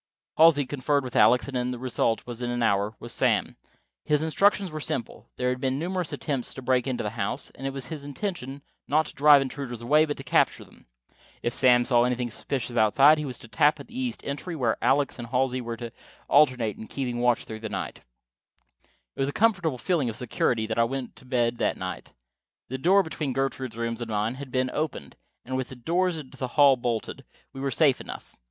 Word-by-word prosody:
Halsey 155 -3 +6
conferred 140 +1 0
with 125 - -7
Alex, 120 +5 +5
and 125 -2 -2
the 125 - -4
result, 120 -2 0 0.2
in 120 - -2
an 120 0 -1
hour, 100 0 +1
was 120 - -4
Sam. - - +1 0.5
His 150 0 +1
instructions 195 +3 +2
were 155 - -5
simple. 120 -5 -4
There 125 0 0
had 125 0 -2
been 130 0 0
numerous 180 +1 -2
attempts 135 -5 -3
to 130 - -8
break 130 0 +1
into 130 -2 -2
the 105 - -3
house; 105 -3 -4
it 135 +1 -5
was 135 -1 -5
the 155 -3 -6
intention, 140 -3 -5 0.2
not 155 +2 +2
to - - -9
drive 145 -1 +6
intruders 130 -4 -6
away, 150 +6 +4
but 145 -1 -4
to 135 - -8
capture - - +2
them. - - -21 0.6
If 120 - -1
Sam 125 -2 +4
saw 120 -2 +4
anything 125 -1 -1
suspicious 120 +1 -4
outside, 135 +7 +5
he 150 - -3
was 130 -3 -5
to 120 - -13
tap 145 +6 +3
at - - -11
the 245 +2 -6
east 250 -4 -3
entry, 145 +5 -4
where 120 -7 +1
Alex 140 -1 +2
and 120 - -6
Halsey 130 +1 0
were 115 -1 -5
to 115 0 -7 0.4
alternate 130 -7 +3
in 110 - -8
keeping 125 -3 -3
watch 120 -1 +2
through 110 -1 -7
the 110 0 -5
night. - - -4 1.2
It - - -15
was 135 - +1
with 145 - -4
a - - -9
comfortable 175 - +2
feeling 150 -3 0
of 110 - -5
security 120 -1 0
that 110 +1 -2
I - - +6
went 130 +1 -4
to - - -16
bed 120 -2 0
that - - 0
night. - - -6 0.6
The 130 +1 -4
door 190 +7 +4
between 155 -5 -3
Gertrude's 130 -3 -2
rooms 115 0 -3
and 120 - -5
mine 105 +2 0
had 140 - -7
been 130 0 0
opened, 155 -1 -4 0.3
and, 130 - -4
with 130 -1 -2
the 130 - -9
doors 175 +7 0
into 135 -3 -10
the 130 - -2
hall 140 -2 +7
bolted, 120 -3 -3 0.3
we 135 - -7
were 140 - 0
safe 140 -1 +3
enough. - - -9
130 Hz, 215 wpm, -26 LUFS, 120-145 Hz, 1.2 s, hall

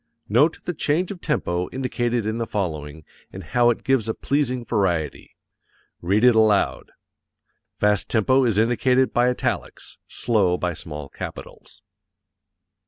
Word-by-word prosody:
Note 145 +10 +3
the 175 - -2
change 160 +4 0
of 185 -3 -8
tempo 90 - -1
indicated 120 -3 -2
in 110 +2 -2
the 115 - -2
following, 80 -6 -4 0.3
and 95 - -9
how 120 +8 +2
it 120 - -1
gives 130 -5 +1
a 110 - -1
pleasing 130 -4 -1
variety. 90 - -1 0.7
Read 100 +6 +1
it 125 -1 +7
aloud. 110 -2 +2 0.9
(Fast 105 -1 +1
tempo 130 +4 +3
is 115 -5 +1
indicated 125 +3 +2
by 120 +1 +3
italics, 125 - -4
slow 100 -7 +1
by 90 -1 -2
small 75 -2 -8
capitals.) 100 +7 -10
115 Hz, 135 wpm, -23 LUFS, 95-125 Hz, 0.9 s, it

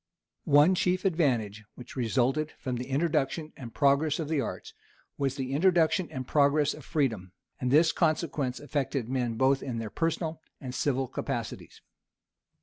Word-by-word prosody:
One 145 +5 +6
chief 185 +1 0
advantage 120 - +1
which 125 -1 -11
resulted 130 +5 0
from 125 -2 -3
the 125 +1 -5
introduction 150 +1 -1
and 120 -3 -9
progress 145 +3 +2
of 155 -3 -4
the 155 -3 +1
arts, - - -6 0.4
was 135 -1 -1
the 135 -1 -4
introduction 175 +2 +3
and 130 -1 -6
progress 145 0 +3
of 150 - -11
freedom; 115 - -1 0.3
and 125 - -1
this 160 +5 +5
consequence 155 -6 0
affected 140 -4 -2
men 125 -3 -1
both 130 +3 +2
in 125 -3 -4
their 110 -2 -5
personal 165 -1 -2 0.2
and 130 -3 -7
civil 135 -1 0
capacities. - - -5
140 Hz, 150 wpm, -28 LUFS, 125-155 Hz, 0.4 s, One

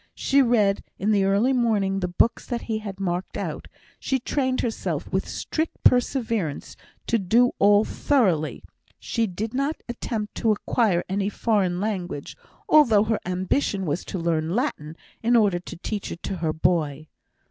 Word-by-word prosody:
She 280 0 +3
read 215 -6 +2
in 210 +3 0
the 200 -2 +3
early 205 +7 +3
morning 210 -6 +1
the 180 - -1
books 180 +6 +1
that 240 -1 -3
he 220 -1 -3
marked 180 -1 -3
out; - - -5 0.3
she 265 - 0
trained 260 0 -1
herself 230 -2 -3
with - - 0
strict 320 +1 -3
perseverance 230 - +1 0.3
to 230 - +1
do 230 +6 +3
all 205 +1 +5
thoroughly; 190 - +1 0.3
she 230 -2 -1
did 210 +5 -4
not 275 +4 -2
attempt 225 -3 -4
to 225 - +2
acquire 210 -3 +1
any 195 +1 -1
foreign 200 -5 0
language, 185 -8 -4 0.3
although 235 -10 +6
her 220 0 0
ambition 190 +2 0
was 160 +2 -2
to - - -5
learn 165 0 -1
Latin, 165 - -2 0.2
in 235 +2 +3
order 205 -6 +3
to 175 - -9
teach 205 +3 -4
it 170 - -8
to 195 - -3
her 160 -2 -1
boy. 155 -2 0
205 Hz, 160 wpm, -24 LUFS, 180-235 Hz, 0.3 s, although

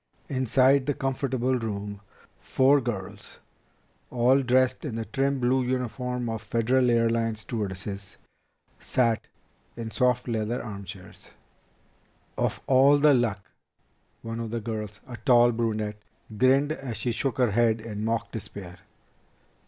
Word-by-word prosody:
Inside 130 +1 +3
the 145 - +1
comfortable 130 -1 -1
room, 100 -2 -5 0.4
four 135 +2 +3
girls, 110 -6 -6 0.7
all 125 +3 +3
dressed 130 0 +2
in 135 -8 -4
the 115 0 -3
trim, 135 +5 0
blue 130 +1 +2
uniform 125 0 -2
of 115 -1 -3
Federal 120 +4 +1
Airlines 115 -1 +1
stewardesses, 100 -3 -5 0.6
sat 115 -3 0 0.5
in 115 -1 -5
soft 125 +4 +1
leather 115 +1 -2
armchairs. 100 -4 -9 1.1
"Of - - -1
all 135 +2 +5
the 145 0 +5
luck!" 110 -6 -1 0.7
One 115 0 -5
of 115 -1 -4
the 115 +1 -2
girls, 105 -2 -5
a 120 -2 -8
tall 120 -2 +5
brunette, 110 -2 -2 0.3
grinned 135 +6 +3
as 135 -7 -5
she 120 +3 -1
shook 115 +1 -2
her 125 -4 +2
head 115 +1 +2
in 110 -2 -6
mock 115 +1 -1
despair. 95 -4 -8
120 Hz, 130 wpm, -26 LUFS, 110-130 Hz, 1.1 s, all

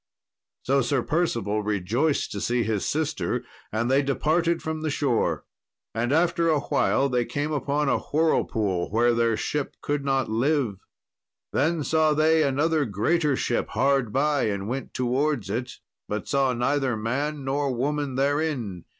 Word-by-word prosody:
So 135 +1 +2
Sir 130 0 0
Percival 115 - 0
rejoiced 105 - 0
to 100 - -4
see 120 0 +1
his 110 -3 -1
sister, 150 -5 -1 0.3
and 110 +2 -1
they 135 +1 +4
departed 165 +5 +1
from 160 0 -4
the 155 - -1
shore. 140 -5 0 0.5
And 120 +3 -1
after 170 +1 +2
a 155 -2 +3
while 140 0 +1
they 125 -2 +1
came 145 +6 -3
upon 145 0 0
a - - +2
whirlpool, 110 - 0
where 120 +3 +3
their 115 -1 +2
ship 145 +5 -3
could 145 -1 -2
not 135 -2 +1
live. 120 -2 0 0.7
Then 160 +2 +1
saw 155 0 +2
they 160 +1 +4
another 150 +2 +2
greater 135 - +1
ship 120 - -1
hard 135 -2 +2
by 145 +2 +1
and 100 -2 -2
went 130 +4 -5
towards 125 -3 0
it, 120 +3 -3 0.4
but 105 0 -3
saw 135 -2 +2
neither 130 0 0
man 140 +6 -2
nor 140 +1 0
woman 140 +2 -1
therein. 135 - -1
135 Hz, 150 wpm, -25 LUFS, 115-150 Hz, 0.7 s, they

